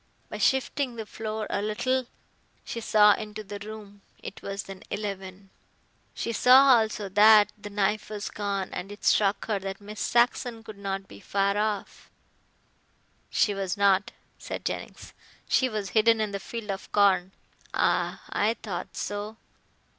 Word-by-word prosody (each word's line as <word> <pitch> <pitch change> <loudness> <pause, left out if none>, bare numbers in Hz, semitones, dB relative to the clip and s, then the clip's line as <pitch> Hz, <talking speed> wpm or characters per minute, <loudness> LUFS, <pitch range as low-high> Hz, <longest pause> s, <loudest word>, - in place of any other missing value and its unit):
By - - -6
shifting 265 -1 +1
the 225 -1 -5
floor 215 0 -4
a - - 0
little 240 +4 -1 0.6
she 230 - -5
saw 210 -1 +6
into 215 0 -6
the 205 0 -7
room. 205 -1 -10 0.2
It 215 - -8
was 200 0 -4
then 195 -1 -10
eleven. 195 -2 -6 0.6
She 230 - -2
saw 255 +2 +7
also 215 -2 -2
that 210 +2 +7
the 205 0 -9
knife 205 +1 0
was 210 -1 -5
gone, 200 -2 -3
and 180 +3 -5
it 205 - -10
struck 200 -1 +3
her 210 -3 -1
that 195 0 -6
Miss 210 +1 -9
Saxon 240 -1 +1
could 215 -3 -11
not 195 -1 -4
be 100 - -13
far 200 - 0
off." 210 -1 -3 1.2
"She 205 - +2
was 195 0 -3
not," 200 -1 +3 0.3
said - - -6
Jennings, - - -5 0.3
"she 260 - +3
was 210 -4 -3
hidden 225 +2 +4
in 215 -1 -1
the 200 - -3
field 225 0 -5
of 195 - -7
corn." 190 -3 +3 0.4
"Ah. - - 0
I 220 +3 +1
thought 185 -7 -6
so. 205 +2 -4
210 Hz, 155 wpm, -27 LUFS, 200-220 Hz, 1.2 s, saw